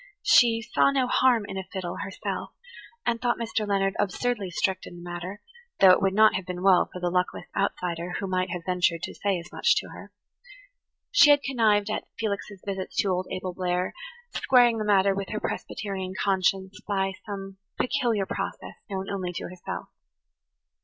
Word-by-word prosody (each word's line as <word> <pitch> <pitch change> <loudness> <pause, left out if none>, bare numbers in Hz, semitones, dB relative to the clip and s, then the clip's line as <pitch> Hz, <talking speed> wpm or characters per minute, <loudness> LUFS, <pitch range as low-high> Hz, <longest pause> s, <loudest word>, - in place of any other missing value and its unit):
She 230 -1 +5
"saw 240 +4 +3
no 270 -2 +2
harm 245 -3 +3
in 195 -1 -4
a - - -4
fiddle," 185 -3 -4
herself, 195 - -5 0.5
and 230 -1 0
thought 240 -1 +1
Mr. 225 -2 -2
Leonard 195 -1 +1
absurdly 205 +1 -1
strict 185 +2 -1
in - - -10
the 175 - -11
matter, 175 +4 -6 0.4
though 190 -1 +9
it 185 - +4
would 195 0 +1
not 215 +1 +6
have 185 -1 -3
been 180 0 -5
well 190 -2 +5
for 180 - -7
the 175 -1 -1
luckless 180 0 -1
outsider 180 -3 -2
who 200 - -3
might 185 -1 -1
have 175 -1 -4
ventured 180 -2 +1
to - - -4
say 200 -2 0
as 170 - -9
much - - +3
to - - -2
her. - - -11 1.0
She - - +7
had 285 -1 +6
connived 215 -5 +2
at - - -3
Felix's 205 -2 -4
visits 195 -2 -4
to 200 - +2
old 185 0 -1
Abel 185 -1 -4
Blair, 180 0 -1 0.4
squaring 245 -3 +4
the 215 - -2
matter 200 -1 +4
with 195 -1 -4
her 215 - -3
Presbyterian 190 -4 -4
conscience 190 0 0
by 195 -1 0
some 195 -1 -6 0.2
peculiar 240 -6 +1
process - - -5 0.2
known 190 -1 -4
only 185 -3 -3
to - - -5
herself. 180 -1 -7
195 Hz, 180 wpm, -26 LUFS, 185-215 Hz, 1.0 s, though